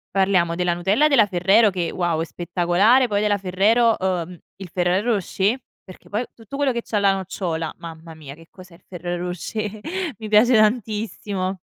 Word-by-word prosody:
parliamo 185 Hz, -3 st, +2 dB
della 180 Hz, -1 st, 0 dB
Nutella 200 Hz, -, +2 dB
della 270 Hz, -8 st, +4 dB
Ferrero 195 Hz, +4 st, +4 dB
che, 180 Hz, -3 st, -3 dB
wow, 175 Hz, -3 st, -1 dB
è -, -, -2 dB
spettacolare. 180 Hz, +9 st, +2 dB
Poi 205 Hz, -2 st, 0 dB
della 210 Hz, -1 st, +1 dB
Ferrero, 210 Hz, +5 st, +2 dB
uhm, 180 Hz, -2 st, -2 dB, 0.2 s
il 190 Hz, -2 st, -10 dB
Ferrero 185 Hz, +6 st, +1 dB
Rocher, 200 Hz, +4 st, -1 dB, 0.2 s
perché 185 Hz, -, -15 dB
poi 215 Hz, +4 st, -2 dB
tutto 230 Hz, +4 st, -11 dB
quello 280 Hz, -1 st, +1 dB
che 235 Hz, -1 st, -3 dB
c'ha 220 Hz, -, -3 dB
la 200 Hz, -1 st, +3 dB
nocciola, 180 Hz, -3 st, -4 dB
mamma 165 Hz, -1 st, -10 dB
mia, 145 Hz, -3 st, -10 dB
che 165 Hz, +2 st, -17 dB
cos'è 185 Hz, -2 st, -15 dB
il 175 Hz, -, -23 dB
Ferrero 175 Hz, 0 st, -5 dB
Rocher, 210 Hz, +4 st, -5 dB, 0.4 s
mi 220 Hz, -, -7 dB
piace 215 Hz, +4 st, +4 dB
tantissimo! 210 Hz, -4 st, -1 dB
190 Hz, 175 wpm, -22 LUFS, 175-215 Hz, 0.4 s, della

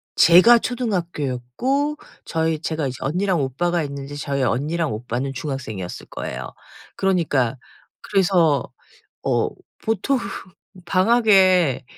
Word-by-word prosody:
제가 185 Hz, +8 st, +7 dB
초등학교였고 210 Hz, -, -2 dB, 0.3 s
저희 160 Hz, -1 st, -1 dB
제가 160 Hz, -3 st, -2 dB
이제 130 Hz, -, -5 dB
언니랑 180 Hz, +3 st, 0 dB
오빠가 170 Hz, +6 st, 0 dB
있는데 140 Hz, 0 st, -6 dB
저희 140 Hz, -1 st, -2 dB
언니랑 150 Hz, +4 st, 0 dB
오빠는 125 Hz, +4 st, -3 dB
중학생이었을 125 Hz, -, -5 dB
거예요. -, -, -5 dB, 0.5 s
그러니까 145 Hz, -10 st, +1 dB, 0.4 s
그래서 175 Hz, -8 st, +2 dB, 0.6 s
어 -, -, +1 dB, 0.3 s
보통 225 Hz, +5 st, 0 dB, 0.7 s
방학에 185 Hz, -, +4 dB
160 Hz, 265 characters per minute, -22 LUFS, 135-190 Hz, 0.7 s, 제가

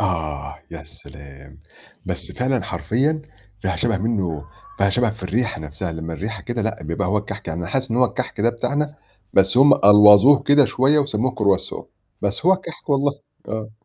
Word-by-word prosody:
آه 80 Hz, -8 st, -3 dB
يا -, -, -8 dB
سلام! 70 Hz, 0 st, -15 dB, 0.5 s
بس -, -, -6 dB
فعلًا 125 Hz, -3 st, -1 dB
حرفيًا 145 Hz, +9 st, -1 dB, 0.4 s
فيها 95 Hz, -4 st, -1 dB
شبه 115 Hz, +3 st, 0 dB
منه 95 Hz, -9 st, -2 dB, 0.3 s
فيها 100 Hz, 0 st, +2 dB
شبه 120 Hz, +1 st, +1 dB
في 110 Hz, -2 st, -11 dB
الريحة 110 Hz, 0 st, -2 dB
نفسها، 80 Hz, +4 st, -6 dB
لما 80 Hz, 0 st, -6 dB
الريحة 100 Hz, +2 st, -6 dB
كده 120 Hz, -2 st, -3 dB
لأ 110 Hz, -3 st, -3 dB
بيبقى 85 Hz, +5 st, -3 dB
هو 105 Hz, +2 st, +1 dB
الكحك 100 Hz, -2 st, -7 dB
يعني 85 Hz, +1 st, -4 dB
حاسس 130 Hz, +6 st, -2 dB
إن 115 Hz, -, 0 dB
هو 125 Hz, -, +4 dB
الكحك 115 Hz, -, -4 dB
ده 115 Hz, -, +3 dB
بتاعنا 145 Hz, +5 st, -2 dB, 0.4 s
بس 95 Hz, +4 st, +3 dB
هم 135 Hz, +1 st, +7 dB
ألوظوه 105 Hz, +6 st, +7 dB
كده 145 Hz, 0 st, +5 dB
شوية 135 Hz, +4 st, +2 dB
وسموه 130 Hz, -3 st, 0 dB
croissant 100 Hz, -4 st, 0 dB, 0.4 s
بس 100 Hz, -, -2 dB
هو 190 Hz, -, +7 dB
الكحك 175 Hz, -4 st, -6 dB
والله، 140 Hz, 0 st, +2 dB, 0.4 s
آه. 110 Hz, 0 st, -5 dB
105 Hz, 175 wpm, -21 LUFS, 95-130 Hz, 0.5 s, هم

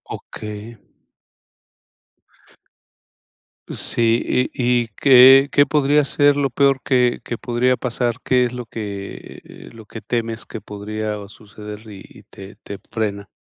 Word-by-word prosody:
Okey. 105 Hz, +2 st, -9 dB, 3.0 s
Sí, 115 Hz, +2 st, 0 dB
¿Y 125 Hz, -1 st, +1 dB
y -, -, -11 dB
qué 135 Hz, +1 st, +7 dB
qué 145 Hz, -, +4 dB
podría 145 Hz, -1 st, +2 dB
ser 145 Hz, 0 st, +2 dB
lo 140 Hz, -1 st, +1 dB
peor 135 Hz, +1 st, +2 dB
que 125 Hz, -2 st, +1 dB
que 120 Hz, -, -4 dB
podría 125 Hz, +1 st, 0 dB
pasar? 120 Hz, -1 st, -2 dB
¿Qué 125 Hz, -1 st, +2 dB
es 120 Hz, -, -4 dB
lo 125 Hz, -1 st, -6 dB
que 100 Hz, -3 st, -8 dB
eh, -, -, -14 dB
lo 110 Hz, -1 st, -13 dB
que 110 Hz, -, -9 dB
temes 115 Hz, -1 st, -4 dB
que 110 Hz, -, -8 dB
podría 105 Hz, 0 st, -5 dB
suceder 105 Hz, 0 st, -11 dB
y 100 Hz, -2 st, -11 dB
y -, -, -17 dB
te 95 Hz, +1 st, -13 dB
te 100 Hz, -, -7 dB
frena? 100 Hz, -3 st, -3 dB
120 Hz, 135 wpm, -20 LUFS, 105-130 Hz, 3.0 s, qué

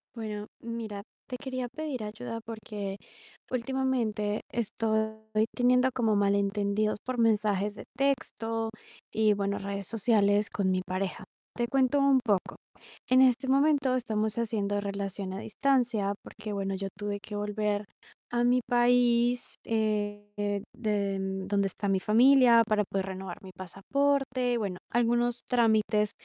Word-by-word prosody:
Bueno, 210 Hz, -2 st, -5 dB
mira, 225 Hz, -3 st, -5 dB, 0.2 s
te 250 Hz, -, -5 dB
quería 255 Hz, -1 st, -4 dB
pedir 295 Hz, -6 st, -4 dB
ayuda 230 Hz, +2 st, -5 dB
porque 210 Hz, -3 st, -6 dB, 0.5 s
últimamente 235 Hz, -5 st, -1 dB
estoy 220 Hz, -1 st, 0 dB, 0.4 s
teniendo 250 Hz, +1 st, +4 dB
como 225 Hz, -4 st, +2 dB
malentendidos 200 Hz, +1 st, +1 dB
por 255 Hz, -1 st, -3 dB
mensajes 210 Hz, -2 st, +2 dB
de -, -, -9 dB
texto 225 Hz, -4 st, -1 dB, 0.4 s
y 215 Hz, -1 st, +4 dB
bueno, 200 Hz, 0 st, -1 dB
redes 200 Hz, 0 st, -4 dB
sociales 210 Hz, -2 st, +2 dB
con 190 Hz, -2 st, 0 dB
mi 185 Hz, 0 st, +1 dB
pareja. 185 Hz, +1 st, -4 dB, 0.3 s
Te 240 Hz, -1 st, 0 dB
cuento 270 Hz, +2 st, +2 dB
un 275 Hz, -1 st, +5 dB
poco. 200 Hz, -5 st, 0 dB, 0.5 s
En 255 Hz, 0 st, +5 dB
este 260 Hz, 0 st, +4 dB
momento 275 Hz, -1 st, +3 dB
estamos 220 Hz, -3 st, -1 dB
haciendo 205 Hz, -3 st, -1 dB
relación 200 Hz, -1 st, -4 dB
a 190 Hz, -, -5 dB
distancia 230 Hz, -3 st, +1 dB
porque, 215 Hz, -1 st, -7 dB
bueno, 195 Hz, -1 st, -2 dB
yo 195 Hz, +1 st, -3 dB
tuve 205 Hz, 0 st, -3 dB
que 210 Hz, 0 st, -8 dB
volver 210 Hz, 0 st, -1 dB, 0.5 s
a 240 Hz, 0 st, +1 dB
mi 250 Hz, +1 st, +3 dB
país, 245 Hz, 0 st, +3 dB
eh, 205 Hz, -2 st, -1 dB
de 205 Hz, -4 st, -1 dB, 0.3 s
donde 200 Hz, -1 st, +1 dB
está 200 Hz, +1 st, -4 dB
mi 195 Hz, -1 st, +2 dB
familia 235 Hz, +3 st, +6 dB
para 215 Hz, -1 st, +2 dB
poder 195 Hz, -1 st, -2 dB
renovar 190 Hz, -1 st, -7 dB
mi 190 Hz, -, -10 dB
pasaporte. 255 Hz, +7 st, 0 dB
Bueno, 195 Hz, -5 st, -3 dB
algunos 240 Hz, 0 st, +1 dB
trámites, 220 Hz, -3 st, +2 dB
215 Hz, 135 wpm, -29 LUFS, 205-245 Hz, 0.5 s, familia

